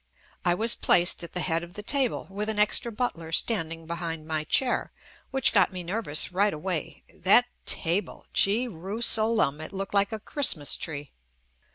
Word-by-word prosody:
I 175 0 +2
was 225 +5 +3
placed 175 0 +3
at 170 - -8
the 180 - -1
head 165 -2 0
of 175 +1 -11
the 210 - -7
table 265 +1 0
with 210 +2 -4
an 220 - -2
extra 210 +3 +3
butler 210 -9 -4
standing 165 -4 -1
behind 165 -1 -5
my 155 -1 -2
chair, 250 +10 +1 0.4
which 265 -2 +1
got 195 -4 +4
me 180 -1 -6
nervous 175 -4 +1
right 200 0 +1
away 170 +1 -4
— - - -25
that 245 +5 +7 0.2
table! 175 +4 0
Gee 220 +6 +1
rusalem, 215 - 0
it - - -8
looked 195 0 -6
like 200 +1 +2
a 220 - -4
Christmas 210 - +3
tree. 145 -4 -5
190 Hz, 175 wpm, -26 LUFS, 165-220 Hz, 0.4 s, that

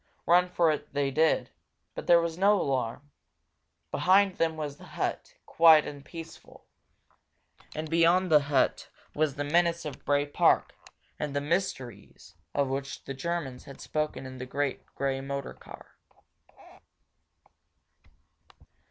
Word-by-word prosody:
Run 180 +1 +4
for 170 -2 +3
it 150 -1 -5
they 140 -1 +1
did, 160 +3 +2 0.4
but - - -7
there 170 -1 +7
was 170 -1 -2
no 200 +3 +3
alarm. 135 0 -2 0.8
Behind 190 +1 +3
them 160 -1 0
was 145 -2 -5
the - - -15
hut, - - -4
quiet 160 -2 +6
and 145 -1 -8
peaceful. 165 +1 -11 1.1
And 155 +1 -4
beyond 170 +3 +3
the 150 - +8
hut 140 -2 0 0.2
was 150 -2 0
the 145 - -2
menace 170 +2 +1
of 150 -3 -7
Bray 145 0 +1
Park 145 - +2 0.5
and 145 -1 -3
the - - +2
mysteries 130 - -4 0.2
of 140 -1 +2
which 135 -1 -4
the 135 - -6
Germans 135 -3 -4
had 140 - -12
spoken 150 -3 -3
in 130 0 -9
the 130 - -6
great 140 +1 -2
grey 135 -1 -1
motor 140 0 -5
car. - - -14
150 Hz, 135 wpm, -28 LUFS, 135-170 Hz, 1.1 s, the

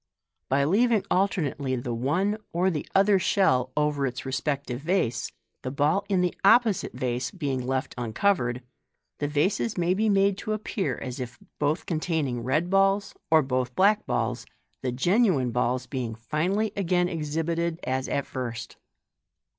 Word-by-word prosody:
By 140 +1 +3
leaving 210 +6 +3
alternately 150 -8 0
the 120 -1 -3
one 175 - 0
or 180 +3 +2
the 150 -4 -4
other 195 0 +5
shell 130 -10 +2
over 150 -2 +1
its 125 +1 -6
respective 135 0 -2
vase, 165 -7 0 0.3
the 130 - -4
ball 150 +8 +1
in 190 -2 +2
the 180 -1 +1
opposite 220 0 +4
vase 125 0 -2
being 135 -6 -3
left 130 +1 -1
uncoveied, 120 - 0 0.6
the 145 - 0
vases 180 +9 0
may 175 +1 +2
be 215 +3 +1
made 195 0 +3
to 215 -1 -2
appear 215 -2 -2
as 125 +1 -6
if 125 -1 -6 0.2
both 150 +2 0
containing 155 -7 -1
red 155 +9 0
balls 195 +1 +2 0.2
or 160 -1 +5
both 130 -1 -2
black 205 +3 +3
balls, 120 +1 -1 0.3
the 130 - -1
genuine 170 - +2
balls 125 +1 0
beins; 120 -6 -4
finally 180 - -1
again 180 -2 +1
exhibited 165 +1 -2
as 130 0 -1
at 140 - -1
first. 120 -3 -6
150 Hz, 150 wpm, -26 LUFS, 130-190 Hz, 0.6 s, other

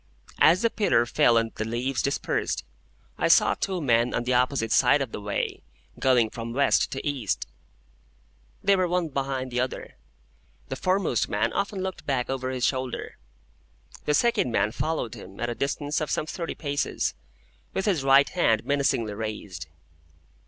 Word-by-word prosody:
As 170 +6 +5
the 230 - +3
pillar 160 - +2
fell 120 -1 +3
and 115 0 0
the - - -3
leaves 120 +4 -1
dispersed, 140 - -1 0.6
I - - +2
saw - - +5
two 190 -2 -2
men 120 -5 +2
on - - 0
the 125 +1 0
opposite 125 -2 +1
side 130 +3 +5
of 135 -5 -3
the - - -6
way, 100 0 -3 0.4
going 125 -4 +3
from 115 0 -6
West 140 +3 +2
to 135 - -4
East. 135 -8 -1 1.2
They 200 0 +5
were 185 -1 +1
one 175 -2 0
behind 135 -2 -3
the 125 - -1
other. 130 +1 -4 0.7
The - - -3
foremost 185 - 0
man 105 +3 0
often 200 -1 -2
looked 190 -1 -5
back 130 -2 0
over 130 -1 -2
his 130 -1 -1
shoulder. 130 -2 -3 0.9
The 150 - +2
second 235 - +2
man 105 -1 +1
followed 155 -3 -2
him, 95 +1 -11
at 120 0 -1
a - - -1
distance 145 +4 -2
of 155 - -2
some - - -1
thirty 165 +1 -5
paces, 145 -2 -1 0.6
with 190 - -1
his 180 -10 +1
right 135 +1 +6
hand 115 -11 +1
menacingly 135 -6 +1
raised. 105 -6 -6
130 Hz, 165 wpm, -26 LUFS, 115-155 Hz, 1.2 s, right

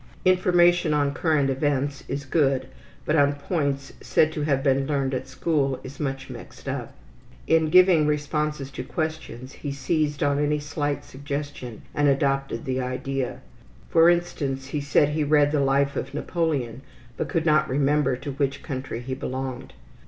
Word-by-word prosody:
Information 175 -3 +4
on 145 -1 +1
current 145 -2 +1
events 140 0 -1
is 140 +1 -4
good, 135 -3 +2 0.4
but 150 - +1
on 145 -2 +4
points 140 -2 -2
said 155 - +2
to 155 - -4
have 140 -3 +1
been 135 -1 +2
learned 140 -2 0
at 130 0 -3
school 135 0 0
is 130 +2 -10
much 135 -2 -3
mixed - - -11
up. - - -4 0.5
In 160 -1 +3
giving 180 -3 +6
responses 150 -1 -1
to 125 - -5
questions, 155 -4 -4
he 145 - -5
seized 145 +2 -1
on 145 0 +2
any 150 0 +1
slight 145 -1 -3
suggestion 140 -4 -6
and 145 0 +2
adopted 135 -3 +1
the 130 0 -1
idea. 130 +1 -3 0.5
For 165 0 +6
instance, 140 -6 -1
he 145 +1 -2
said 145 +1 +3
he 150 +1 -2
had 145 -1 0
read 145 -1 +4
the 150 - +1
life 140 +1 +2
of 135 - -4
Napoleon, 145 -8 -1 0.3
but - - -3
could 165 -3 0
not 155 -1 +3
remember 140 0 +2
to 140 +3 -6
which 140 0 -2
country 130 -3 -5
he 130 +2 -4
belonged. 130 -1 -5
145 Hz, 165 wpm, -25 LUFS, 135-150 Hz, 0.5 s, giving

